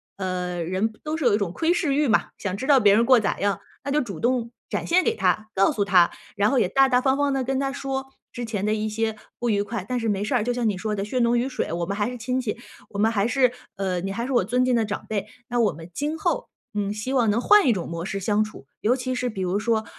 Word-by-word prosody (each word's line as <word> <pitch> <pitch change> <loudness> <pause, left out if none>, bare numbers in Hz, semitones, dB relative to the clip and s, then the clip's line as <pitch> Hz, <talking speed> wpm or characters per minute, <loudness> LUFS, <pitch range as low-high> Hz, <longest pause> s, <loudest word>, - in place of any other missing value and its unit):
呃， 180 -2 -3
人 190 +6 -1
都 310 +1 -2
是 310 - -2
有 235 - +5
一 - - +2
种 200 -5 -2
窥 330 - +1
视 330 -6 0
欲 295 +1 +2
嘛！ 225 - +2
想 190 -3 -3
知 220 - -5
道 280 -3 +6
别 205 -3 +5
人 230 +2 +4
过 255 0 +6
得 215 - -4
咋 - - 0
样？ 200 -2 +1 0.2
那 280 - -3
就 300 - +3
主 200 - -4
动 240 -1 +1 0.2
展 - - -3
现 365 +2 +4
给 - - +2
她、 205 +2 +1
告 195 0 +4
诉 205 - +1
她。 180 -3 +5 0.3
然 205 +1 +3
后 275 - +1
也 180 - +2
大 270 +4 +5
大 250 -1 +3
方 265 +1 +2
方 285 -1 +1
地 270 -1 0
跟 265 +1 -1
她 275 0 -1
说 270 -1 -3 0.3
之 240 -1 -5
前 210 -3 -3
的 215 - +2
一 215 0 -1
些 220 0 -2 0.2
不 240 - -1
愉 205 -1 +2
快， 205 -2 -4
但 250 -1 -1
是 225 - -2
没 205 -1 0
事 215 - -2
儿， 245 - +3
就 245 - 0
像 240 -2 0
你 200 - -2
说 210 +2 -2
的， 195 - -2
血 230 +5 -2
浓 235 0 +3
于 255 +3 0
水， 255 - -3
我 170 0 -1
们 200 +3 -3
还 205 +2 0
是 250 - -6
亲 250 +2 -1
戚， 235 -4 -3 0.3
我 200 - -6
们 220 +2 +3
还 205 -1 +1
是 255 0 +3 0.2
呃， 185 -2 -1
你 195 +2 -3
还 235 +4 -3
是 270 - -4
我 240 -8 +3
尊 250 +4 +1
敬 255 0 +2
的 230 -2 +2
长 205 - -5
辈。 210 -2 -2 0.2
那 245 - 0
我 215 -8 +3
们 165 +2 -11
今 300 - -2
后， 345 +2 -1 0.3
嗯， 205 -1 -1
希 215 +5 -4
望 245 -5 +3
能 215 +3 +2
换 415 +2 +6
一 240 - +5
种 180 - -3
模 170 0 -4
式 195 +1 -3
相 210 +2 +2
处， 215 -11 -5
尤 235 +4 +2
其 255 0 -3
是 250 0 -1
比 200 -4 -5
如 180 -1 -1
人 200 - +1
说， 220 0 0
225 Hz, 320 characters per minute, -24 LUFS, 200-255 Hz, 0.3 s, 道